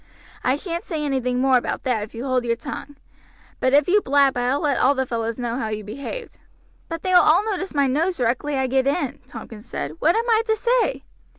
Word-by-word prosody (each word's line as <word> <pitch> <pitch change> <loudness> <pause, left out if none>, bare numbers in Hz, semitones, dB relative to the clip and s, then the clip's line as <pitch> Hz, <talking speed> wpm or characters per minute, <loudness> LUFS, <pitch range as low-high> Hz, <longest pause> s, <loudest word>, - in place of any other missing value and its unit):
I 255 - +2
shan't 340 +3 -4
say 310 -4 -3
anything 250 -3 0
more 260 0 +4
about 245 - -3
that 250 -5 0
if 210 +2 -8
you 235 +3 -5
hold 255 -2 +1
your 235 -1 0
tongue; 290 +3 -8 0.6
but 260 - +2
if 285 +1 +4
you 410 +3 +4
blab 280 -3 +3
I 245 +2 +1
will 290 - -2
let 285 -4 +1
all 275 +2 +4
the 265 0 0
fellows 230 -2 -3
know 240 -1 -2
how 225 - -2
you 215 0 -4
behaved." 280 - -7 0.5
"But 330 -1 -5
they 370 - 0
will 360 - +8
all 420 - +4
notice 385 -5 -3
my 280 -1 +3
nose 320 +7 0
directly 255 +4 0
I 265 - +1
get 265 +1 +1
in," 280 -2 -1
Tompkins 225 0 -10
said. 140 - -4
"What 330 +5 +3
am 460 +2 0
I 450 -1 +4
to 440 - +3
say?" 480 +2 +1
270 Hz, 230 wpm, -22 LUFS, 245-330 Hz, 0.6 s, will